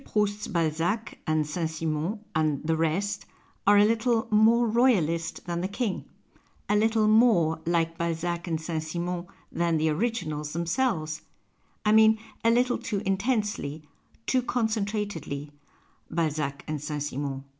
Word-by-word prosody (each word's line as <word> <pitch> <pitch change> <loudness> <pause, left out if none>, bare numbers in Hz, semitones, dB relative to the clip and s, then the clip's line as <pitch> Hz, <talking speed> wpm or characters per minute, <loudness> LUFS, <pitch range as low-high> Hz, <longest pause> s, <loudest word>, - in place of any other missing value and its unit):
Proust's 210 -2 -1
Balzac 170 +5 -1
and 155 -1 +2
St. 160 +2 -2
Simon 160 +6 -2
and 155 -3 0
the 160 +1 +1
rest 165 +6 -1 0.4
are 205 0 +7
a 205 - +7
little 230 +1 +1
" - - -21
more 225 +3 +5
Royalist 185 -9 +1
than 170 -1 -2
the 185 - -1
King," 200 0 -2 0.6
a 205 - +2
little 220 0 +3
more 215 -8 +4
like 165 0 0
Balzac 170 +1 -2
and 165 -2 -1
St. 160 0 -3
Simon 175 +2 -4 0.2
than 170 -1 +1
the 155 +1 +2
originals 155 -5 -2
themselves; 165 -2 -1 0.6
I 210 - +4
mean, 220 0 +6 0.3
a 230 - +5
little 245 +1 +2
too 210 -6 -3
intensely, 195 - -1 0.4
too 255 - +2
concentratedly, 205 - -2 0.6
Balzac 150 -4 -1
and 155 -2 -3
St. 150 -1 -3
Simon. 140 -1 -4
170 Hz, 140 wpm, -27 LUFS, 155-215 Hz, 0.6 s, are